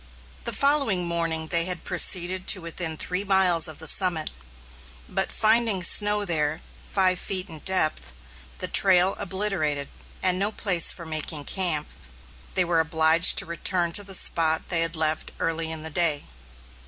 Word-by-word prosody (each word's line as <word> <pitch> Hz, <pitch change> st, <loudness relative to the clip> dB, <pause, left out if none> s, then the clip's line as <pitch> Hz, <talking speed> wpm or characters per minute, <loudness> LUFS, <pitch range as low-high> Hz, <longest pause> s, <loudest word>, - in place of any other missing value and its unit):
The -, -, -1 dB
following 275 Hz, -11 st, 0 dB
morning 165 Hz, -1 st, -2 dB
they 170 Hz, -1 st, +2 dB
had 180 Hz, -2 st, -2 dB
proceeded 180 Hz, 0 st, 0 dB
to 195 Hz, -, +3 dB
within 165 Hz, -1 st, -4 dB
three 180 Hz, +4 st, -5 dB
miles 185 Hz, -4 st, +4 dB
of 155 Hz, -2 st, -8 dB
the 160 Hz, -, -7 dB
summit; 170 Hz, -3 st, +3 dB, 0.8 s
but -, -, -4 dB
finding 220 Hz, -3 st, +2 dB
snow 205 Hz, +3 st, +4 dB
there 155 Hz, -3 st, -2 dB, 0.2 s
five 185 Hz, -2 st, 0 dB
feet 185 Hz, -2 st, 0 dB
in 160 Hz, -1 st, -10 dB
depth, 155 Hz, -, 0 dB, 0.5 s
the -, -, -3 dB
trail 190 Hz, -1 st, +3 dB
obliterated, 180 Hz, -8 st, -3 dB, 0.3 s
and 185 Hz, 0 st, +1 dB
no 200 Hz, +2 st, -1 dB
place 180 Hz, -6 st, +2 dB
for 170 Hz, -, -12 dB
making 155 Hz, -2 st, -3 dB
camp, 170 Hz, -6 st, 0 dB, 0.7 s
they 185 Hz, -, +1 dB
were 170 Hz, -1 st, -1 dB
obliged 160 Hz, +1 st, +2 dB
to -, -, +3 dB
return 170 Hz, +1 st, -1 dB
to 205 Hz, -, +2 dB
the 195 Hz, -1 st, -2 dB
spot 160 Hz, -2 st, +1 dB
they 170 Hz, -2 st, +3 dB
had 165 Hz, 0 st, -1 dB
left 155 Hz, 0 st, -2 dB
early 165 Hz, 0 st, -4 dB
in 160 Hz, -1 st, -8 dB
the 160 Hz, -, -6 dB
day. 155 Hz, -2 st, +2 dB
175 Hz, 160 wpm, -23 LUFS, 160-190 Hz, 0.8 s, miles